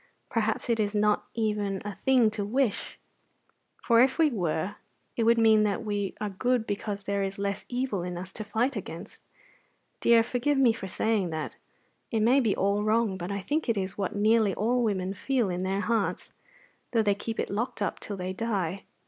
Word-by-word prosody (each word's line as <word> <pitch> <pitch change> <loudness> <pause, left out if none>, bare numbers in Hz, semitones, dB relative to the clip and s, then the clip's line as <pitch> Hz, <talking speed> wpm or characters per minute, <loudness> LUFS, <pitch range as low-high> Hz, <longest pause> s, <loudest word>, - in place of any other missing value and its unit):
Perhaps 220 0 0
it 230 -2 +1
is 210 0 0
not 210 0 +2
even 210 -3 -1
a 205 - -4
thing 235 +2 +3
to 210 -1 -3
wish; 235 +1 -1 0.9
for 235 -1 +5
if 260 +1 +3
we 320 -3 +4
were, 185 -1 -2 0.4
it 230 - +1
would 230 +1 +5
mean 220 -1 +5
that 210 0 0
we 205 -2 -2
are 210 -1 -3
good 245 +4 0
because 205 -1 -3
there 200 +1 -1
is 195 0 -3
less 200 0 -3
evil 245 -6 -1
in 175 0 -4
us 185 +2 -7
to 215 - -4
fight 230 +6 0
against. 170 -5 -7 0.8
Dear, 230 -1 +5
forgive 250 +4 0
me 255 -4 +5
for 205 -4 -6
saying 205 -1 0
that; 160 -1 -4 0.5
it 225 -3 0
may 245 +5 +5
be 225 -6 +2
all 200 +1 +1
wrong; 215 -2 +2
but 180 +1 -5
I 200 0 -2
think 295 +6 -1
it 225 - +2
is 190 -1 -2
what 195 -1 -3
nearly 215 0 +3
all 245 +4 +1
women 190 -3 -1
feel 240 -1 0
in 180 0 -2
their 190 +1 -1
hearts, 225 -1 -1 0.6
though 225 -2 +3
they 205 -1 +3
keep 220 +2 -5
it - - -2
locked 225 +5 -2
up 205 - -2
till 205 - -6
they 185 0 -3
die. 195 -4 -2
210 Hz, 200 wpm, -28 LUFS, 195-230 Hz, 0.9 s, for